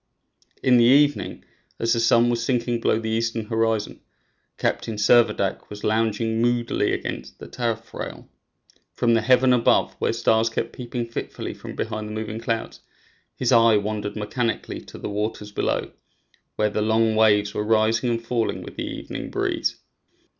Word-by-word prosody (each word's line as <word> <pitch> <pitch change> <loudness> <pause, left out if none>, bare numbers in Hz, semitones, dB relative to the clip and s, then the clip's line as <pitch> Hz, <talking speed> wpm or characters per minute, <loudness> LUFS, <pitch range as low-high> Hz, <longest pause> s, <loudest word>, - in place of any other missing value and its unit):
In 125 -2 +5
the 120 - +5
evening, 145 +3 +3 0.3
as 115 0 +1
the 115 - +1
sun 120 +1 +4
was 115 -1 -1
sinking 120 -1 0
below - - +2
the 110 0 -3
eastern 115 0 -1
horizon, 110 -2 -1 0.6
Captain 110 - -1
Servadac 105 -2 +2
was 105 0 -9
lounging 110 +1 0
moodily 120 0 +1
against 65 +2 -5
the - - -10
taffrail. 115 -2 -5 0.7
From 115 -1 +2
the 115 - +3
heaven 130 +2 +4
above, 120 -2 +3
where - - +1
stars 110 +1 +2
kept 115 0 -3
peeping 120 -1 -4
fitfully 115 - -5
from - - -9
behind 110 0 -3
the 105 - -6
moving 110 0 -4
clouds, 115 0 -3 0.6
his 125 - 0
eye 115 -2 +6
wandered 105 0 -3
mechanically 115 +2 -3
to - - -11
the - - -5
waters 105 0 -3
below, - - -1 0.6
where 105 -1 +1
the 105 - -1
long 110 +1 +2
waves 105 -2 +3
were - - -2
rising 110 +2 +2
and 115 -1 -2
falling 115 -1 -1
with - - -11
the - - -3
evening - - -6
breeze. - - -1
115 Hz, 160 wpm, -23 LUFS, 110-120 Hz, 0.7 s, eye